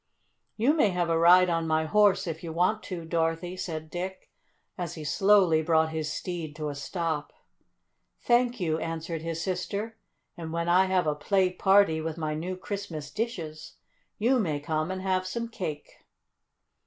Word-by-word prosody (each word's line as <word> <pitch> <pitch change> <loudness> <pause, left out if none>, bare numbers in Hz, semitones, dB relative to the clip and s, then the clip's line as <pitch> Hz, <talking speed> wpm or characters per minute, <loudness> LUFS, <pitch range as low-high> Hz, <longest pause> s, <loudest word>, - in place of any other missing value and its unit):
"You 245 +7 +3
may 295 -10 +3
have 175 -2 0
a 165 - +3
ride 180 +2 +7
on 165 -1 0
my 160 0 +1
horse 200 +1 +3
if 165 -1 -5
you 165 - -5
want 180 +6 +1
to, 175 -3 -6
Dorothy," 165 +2 -1
said 160 -4 -5
Dick, 185 +2 -6 0.4
as 175 -2 -5
he 155 - -7
slowly 185 0 +4
brought 160 0 +2
his 155 -1 -3
steed 165 -3 -5
to 150 -1 -3
a - - -4
stop. 155 +1 -3 0.9
"Thank 245 0 +2
you," 160 -3 0
answered 165 0 -4
his 165 0 -3
sister. 200 +4 -3 0.4
"And 165 -2 -7
when 170 +1 -2
I 180 +2 +5
have 185 -2 +1
a 150 - +1
play 185 +4 +1
party 190 -4 +4
with 160 0 -4
my 155 -2 -2
new 175 +4 -4
Christmas 180 -7 -6
dishes 165 -7 -5 0.4
you 250 +4 +3
may 155 -9 -1
come 155 +2 -2
and 185 0 -4
have 185 -1 0
some 235 +5 -3
cake." 155 -9 -6
170 Hz, 170 wpm, -28 LUFS, 160-190 Hz, 0.9 s, ride